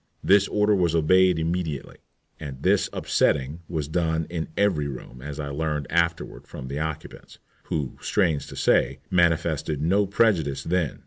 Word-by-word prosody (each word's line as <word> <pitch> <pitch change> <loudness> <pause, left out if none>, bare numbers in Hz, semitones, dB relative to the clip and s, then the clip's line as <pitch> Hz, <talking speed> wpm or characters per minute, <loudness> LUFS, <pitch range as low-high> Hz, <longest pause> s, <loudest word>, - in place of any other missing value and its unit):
This 100 0 +5
order 105 0 +2
was 85 -4 +1
obeyed 90 +2 +4
immediately. 80 -3 -3 0.4
And 70 -4 -8
this - - +3
upsetting 70 +2 0
was 80 -4 -2
done 80 0 0
in 80 -2 -3
every 95 -8 +2
room, 65 -2 -9
as 75 +2 -7
I 70 -1 -4
learned 75 0 -2
afterward 85 -1 -1
from 65 - -8
the 70 +2 -3
occupants, 80 -1 -6 0.3
who, 70 -4 -3
strange 85 -8 0
to - - -9
say, - - +2
manifested 80 -4 +1
no 95 +7 +2
prejudice 85 -11 +1
then. 85 -4 -1
80 Hz, 150 wpm, -25 LUFS, 75-90 Hz, 0.4 s, This